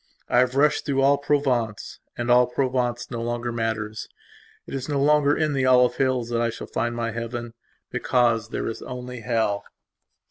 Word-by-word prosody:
I 120 - +4
have 125 +1 +2
rushed 145 +2 +3
through 135 -1 0
all 140 +1 +4
Provenceand 125 -4 -2
all 125 0 +6
Provence 125 -2 -1
no 115 - -3
longer 120 +1 -2
matters. 110 -2 -3 0.6
It - - -10
is 135 +1 -4
no 145 -1 0
longer 145 0 +3
in 155 -2 +1
the 130 -2 +1
olive 125 -1 +4
hills 130 -3 0
that 120 -1 0
I 120 - +1
shall 115 - -7
find 120 0 -2
my 115 -1 -2
Heaven; 115 +1 -5 0.4
because 115 -3 +1
there - - -3
is 115 - -4
only 125 0 -7
Hell... 110 -3 0
120 Hz, 175 wpm, -24 LUFS, 115-135 Hz, 0.6 s, all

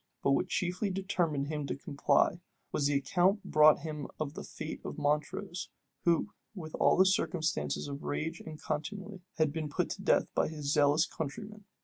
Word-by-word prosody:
But 140 - +3
what 160 +7 +2
chiefly 180 +3 -1
determined 180 -7 0
him 150 -2 -3
to - - -2
comply, 140 +4 +1 0.3
was 145 - +1
the 145 - +1
account 185 +8 +2
brought 155 -1 +6
him 150 -3 -5
of 150 -2 -2
the - - -7
fate 155 - -7
of - - -6
Montrose, 155 +5 -1 0.4
who, 170 +3 +3 0.3
with 160 -5 -7
all - - +5
the 190 - +7
circumstances 155 - 0
of 140 0 -6
rage 160 +2 -3
and 155 -1 -8
contumely, 190 +6 -4 0.2
had 155 -2 +2
been 155 -2 -3
put - - -1
to - - -5
death - - +3
by - - +2
his 150 -2 -2
zealous 145 +2 +4
countrymen. 205 +7 -6
155 Hz, 175 wpm, -31 LUFS, 145-185 Hz, 0.4 s, the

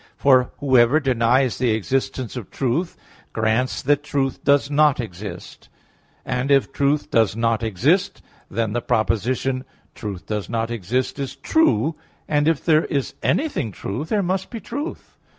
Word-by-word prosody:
For 130 -3 +4
whoever 130 +1 +4
denies 125 -2 +2
the 125 -1 +2
existence 130 +3 -2
of 120 -6 -6
truth 140 +7 -1 0.4
grants 110 +3 0
that 145 +1 +2
truth 140 -3 -2
does 140 0 +3
not 150 -2 +4
exist: 95 -4 -8 0.6
and, 125 +2 -2
if 140 -1 +3
truth 145 +1 0
does 110 -3 +3
not 115 -1 +1
exist, 120 - +1 0.3
then 110 0 -1
the 120 - -1
proposition 125 +4 0 0.3
"Truth 100 -5 -6
does 105 -2 -4
not 115 0 -2
exist" 120 +6 -2
is 135 -1 -4
true: 155 - +2 0.3
and 145 0 +1
if 160 -3 +1
there 155 -2 +4
is 140 -3 -2
anything 275 - 0
true, 100 +7 -4
there 200 +6 0
must 185 +1 -1
be 230 - -6
truth. 290 - -7
130 Hz, 150 wpm, -22 LUFS, 115-145 Hz, 0.6 s, For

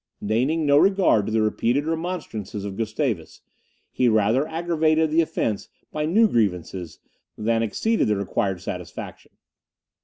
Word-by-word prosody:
Deigning 130 +10 +1
no 145 0 +5
regard 190 - +3
to - - -2
the 110 0 +2
repeated 120 +6 0
remonstrances 160 - -4
of 100 -1 -5
Gustavus, 110 - -3 0.5
he 125 - +2
rather 110 +6 +2
aggravated 160 -1 +1
the 165 +2 +4
offence 110 -9 -2 0.2
by 150 0 -2
new 220 +7 +4
grievances, 90 - -1 0.4
than 115 +1 +1
acceded 220 - 0
the 105 - +2
required 95 -2 -2
satisfaction. - - -7
120 Hz, 130 wpm, -23 LUFS, 105-160 Hz, 0.5 s, no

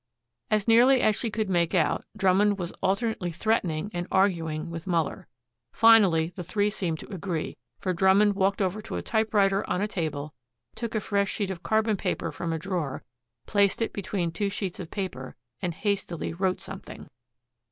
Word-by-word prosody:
As 215 -1 +1
nearly 245 +4 +6
as 215 - +3
she 230 - -2
could 215 0 -2
make 175 -2 +1
out, 155 -5 +1
Drummond 200 +1 +3
was 175 -2 -4
alternately 200 -1 0
threatening 185 -2 0
and 175 0 -3
arguing 170 -4 +1
with 165 +2 -7
Muller. 165 -4 -1 0.5
Finally 200 -8 +5
the 185 - -5
three 205 +4 0
seemed 175 -6 -2
to - - -10
agree, 175 -3 -3 0.2
for 185 - -2
Drummond 195 +3 +4
walked 195 0 +1
over 190 +3 -2
to - - -6
a - - -3
typewriter 205 -3 +2
on - - 0
a 205 - 0
table, 155 -7 -3 0.4
took 230 0 -5
a 215 - +1
fresh 200 -1 0
sheet 200 -3 -2
of 175 -3 -6
carbon 220 +1 +1
paper 165 -3 -2
from 165 +3 -4
a 165 - -1
drawer, 165 -6 -3 0.4
placed 200 -1 +2
it 225 - -1
between 185 -3 -2
two 200 +4 -1
sheets 195 -2 -4
of 175 -3 -6
paper, 180 -10 -5 0.3
and 175 -2 -2
hastily 195 -6 -2
wrote 185 +1 0
something. 195 - -9
190 Hz, 175 wpm, -27 LUFS, 170-210 Hz, 0.5 s, nearly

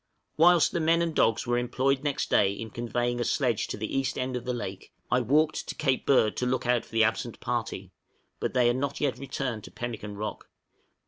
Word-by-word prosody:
Whilst 170 +1 +5
the 170 - -1
men 165 +1 +3
and 165 -1 -2
dogs 115 -6 +2
were 120 0 +1
employed 130 +3 0
next 145 -1 -1
day 100 -2 +4
in 110 +2 -7
conveying 120 +1 -2
a - - +1
sledge 120 -3 0
to - - -5
the 105 +1 -4
east 135 -2 0
end 130 0 -2
of 125 -1 -4
the 125 - -1
lake, 95 -5 -6 0.2
I 125 +1 +3
walked 150 +6 +1
to - - -5
Cape 130 -4 0
Bird 120 -6 +4
to 125 - 0
look 130 0 -1
out 120 -1 +2
for - - -21
the 115 -1 +3
absent 115 +1 -1
party, 110 -6 -3 0.5
but - - -3
they 125 -1 +4
had 120 +1 +3
not 140 +1 -2
yet 140 -3 0
returned 130 -5 -4
to - - -11
Pemmican 110 -4 -6
Rock. 105 +1 -5
125 Hz, 220 wpm, -28 LUFS, 115-135 Hz, 0.5 s, Whilst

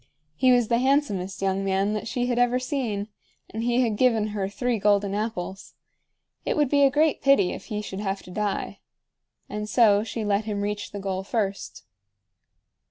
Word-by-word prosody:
He 255 +9 +4
was 245 -2 +4
the 235 +1 +2
handsomest 225 -9 0
young 195 0 0
man 195 +1 +1
that 215 - -3
she 245 +1 -1
had 245 -1 0
ever 245 0 +3
seen, 255 -6 -2 0.4
and 220 - -4
he 240 +2 +2
had 225 -4 0
given 225 -4 +2
her 200 -2 -3
three 240 +2 -1
golden 200 -1 +2
apples. 200 -3 -4 0.7
It - - -1
would 295 -3 +2
be 285 0 +3
a 275 - +6
great 300 +2 +2
pity 275 -10 +4
if - - -8
he 210 -2 -4
should 195 -1 -6
have 195 -1 -3
to 180 - -12
die. 210 +1 -3 0.7
And 210 0 -5
so 210 -1 +4
she 225 -1 -4
let 205 +1 +1
him 205 -2 -2
reach 205 0 -3
the 205 - -6
goal 190 -1 -3
first. 195 - -3
210 Hz, 185 wpm, -25 LUFS, 200-245 Hz, 0.7 s, a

